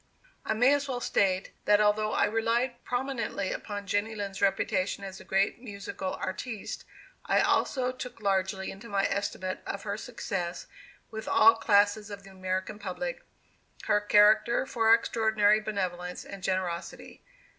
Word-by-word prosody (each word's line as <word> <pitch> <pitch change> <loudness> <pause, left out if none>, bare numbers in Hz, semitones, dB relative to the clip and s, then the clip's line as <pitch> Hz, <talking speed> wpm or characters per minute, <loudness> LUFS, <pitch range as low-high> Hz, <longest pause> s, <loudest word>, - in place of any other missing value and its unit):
I 220 - -1
may 250 +5 +5
as 285 0 0
well 255 -2 -2
state, 190 -5 +1
that 210 0 +5
although 210 +1 +2
I - - +3
relied 235 +3 0
prominently 245 -6 -2
upon 205 -1 -5
Jenny 205 +2 -1
Lind's 200 -2 -5
reputation 200 0 0
as 195 -1 -7
a - - -11
great 195 +4 0
musical 200 -4 -5
artiste, 215 +3 -5 0.4
I - - +3
also 255 -2 +1
took 250 -2 -8
largely 190 -1 0
into 205 +4 -11
my 200 -1 +1
estimate 185 -2 -2
of 200 - -4
her 205 -1 -3
success 190 -7 -4 0.5
with 220 0 -6
all 225 +1 +7
classes 210 -1 +2
of 200 -1 -8
the 195 - -13
American 185 +2 -3
public, - - -4 0.6
her 210 -1 +2
character 210 +4 +4
for 225 -4 +2
extraordinary 220 -2 +4
benevolence 180 -4 -4
and 200 -1 -9
generosity. 185 -2 -3
205 Hz, 145 wpm, -29 LUFS, 195-225 Hz, 0.6 s, all